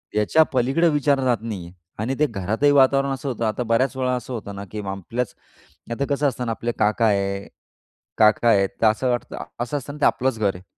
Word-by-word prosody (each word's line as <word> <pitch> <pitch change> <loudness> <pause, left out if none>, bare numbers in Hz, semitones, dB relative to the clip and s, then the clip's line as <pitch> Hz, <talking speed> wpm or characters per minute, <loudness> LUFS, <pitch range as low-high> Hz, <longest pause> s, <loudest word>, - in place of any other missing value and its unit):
याच्या 105 +10 +4
पलीकडे 135 +7 +2
विचारणा 145 -3 +1
जात 120 -2 +3
नाहीये 95 -7 -6 0.3
आणि 125 +5 -1
ते 150 - +4
घरातही 110 +6 +1
वातावरण 135 0 +4
असं 135 +1 -4
होतं. 120 -2 -2
आता 110 +3 -1
बऱ्याच 120 +4 +1
वेळा 125 -1 0
असं 125 +1 -6
होतं 100 -4 -6
ना, 100 0 -7
की 105 - -4
आपल्याच 100 +5 -4 0.6
आता 130 +4 -1
कसं 145 +1 +1
असतं 125 -2 -3
ना, 115 - -1
आपले 115 +1 -2
काका 110 +2 +2
आहे 100 -1 0 0.7
काका 110 +2 +4
आहे 100 -3 +4
तर 100 +3 -1
असं 120 +4 +2
वाटतं 120 - -3 0.2
असं 120 +4 -2
असतं 140 0 -6
ना, 150 - -10
ते - - +4
आपलंच 130 -2 +1
घर 100 -3 +1
आहे. 90 +1 -12
120 Hz, 210 wpm, -22 LUFS, 105-135 Hz, 0.7 s, याच्या